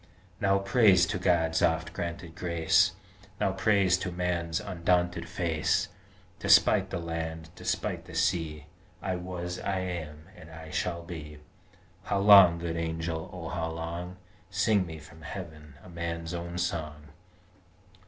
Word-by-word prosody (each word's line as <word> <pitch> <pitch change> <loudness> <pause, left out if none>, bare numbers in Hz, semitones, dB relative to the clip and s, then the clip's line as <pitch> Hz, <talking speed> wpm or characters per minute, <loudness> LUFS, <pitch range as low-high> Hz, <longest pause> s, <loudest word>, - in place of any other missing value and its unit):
Now 100 -2 +3
Praise 100 -2 +5
to 90 - -3
God's 85 -3 +2
oft 80 0 +1
granted 85 -2 -5
grace, 85 -2 +2 0.5
Now 95 - +2
Praise 95 -1 +3
to 90 - -3
Man's 85 -2 -1
undaunted 90 -1 0
face, 80 -3 0 0.5
Despite - - +5
the - - -3
land, 80 -1 -5
despite - - -3
the - - -11
sea, 80 -5 0 0.4
I 95 -1 -1
was: 90 0 -5
I 95 - -1
am: 80 -4 -5
and 80 -6 -13
I 80 -1 -10
shall 85 -2 -2
be 75 -4 -8 0.7
How 100 - 0
long, 100 -4 +8
Good 85 -1 -3
Angel, 80 +1 -3
O 85 -3 -7
how 80 -1 -2
long? 85 +3 -5 0.3
Sing 95 0 +2
me 80 -1 -7
from 80 +1 -14
Heaven 80 -4 -8
a - - -13
man's 85 0 -4
own 85 0 -5
song! 75 -4 -3
85 Hz, 140 wpm, -29 LUFS, 80-90 Hz, 0.7 s, long